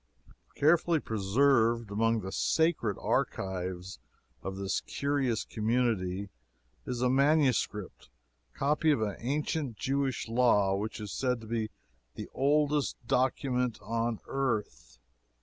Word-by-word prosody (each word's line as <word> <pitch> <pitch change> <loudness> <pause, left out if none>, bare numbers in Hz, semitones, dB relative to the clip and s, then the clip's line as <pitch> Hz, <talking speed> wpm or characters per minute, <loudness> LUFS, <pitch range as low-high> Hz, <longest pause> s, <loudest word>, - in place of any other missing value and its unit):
Carefully 165 +2 +3
preserved 115 +1 +2
among 115 +2 +1
the 95 - -6
sacred 160 - +1
archives 95 0 -2 0.4
of 95 - -5
this 95 0 -1
curious 140 -5 -1
community 105 -4 -1 0.6
is 125 -1 -2
a - - +4
MSS. 140 -1 +3 0.9
copy 150 +3 +1
of 150 - +4
the 105 -3 -1
ancient 140 -1 -2
Jewish 135 0 -1
law, 115 -5 +3
which 105 +3 -4
is 105 -2 -6
said 125 -2 0
to - - -10
be 110 -1 -2 0.5
the - - -6
oldest 145 +1 +2
document 125 -1 +1
on 115 0 -1
earth. 105 - -3
120 Hz, 115 wpm, -30 LUFS, 105-140 Hz, 0.9 s, a